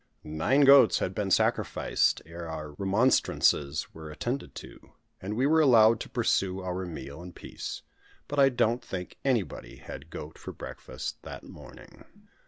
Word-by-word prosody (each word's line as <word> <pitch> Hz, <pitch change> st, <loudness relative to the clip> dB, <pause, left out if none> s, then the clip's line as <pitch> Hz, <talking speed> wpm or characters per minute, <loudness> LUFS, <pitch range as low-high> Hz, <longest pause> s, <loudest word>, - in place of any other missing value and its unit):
Nine 80 Hz, -, +1 dB
goats 140 Hz, 0 st, +7 dB
had 90 Hz, -, -2 dB
been 100 Hz, 0 st, -2 dB
sacrificed, -, -, +1 dB
ere 85 Hz, +1 st, -8 dB
our 75 Hz, -1 st, -6 dB
remonstrances 95 Hz, -, +1 dB
were 80 Hz, -1 st, -9 dB
attended 120 Hz, -, -4 dB
to; -, -, -12 dB, 0.3 s
and 100 Hz, +3 st, -4 dB
we 130 Hz, +4 st, +1 dB
were 160 Hz, +2 st, +4 dB
allowed 115 Hz, -5 st, +6 dB
to -, -, -7 dB
pursue 95 Hz, -1 st, 0 dB
our 90 Hz, 0 st, -4 dB
meal 75 Hz, -2 st, -8 dB
in 90 Hz, 0 st, -10 dB
peace. -, -, -7 dB, 0.4 s
But 145 Hz, -, -2 dB
I 135 Hz, -1 st, +7 dB
don't 120 Hz, -1 st, 0 dB
think 90 Hz, -6 st, -7 dB
anybody 115 Hz, -, -1 dB
had 70 Hz, +4 st, -10 dB
goat 75 Hz, -1 st, -9 dB
for -, -, -8 dB
breakfast -, -, -7 dB
that -, -, -9 dB
morning. -, -, -14 dB
95 Hz, 155 wpm, -28 LUFS, 80-125 Hz, 0.4 s, goats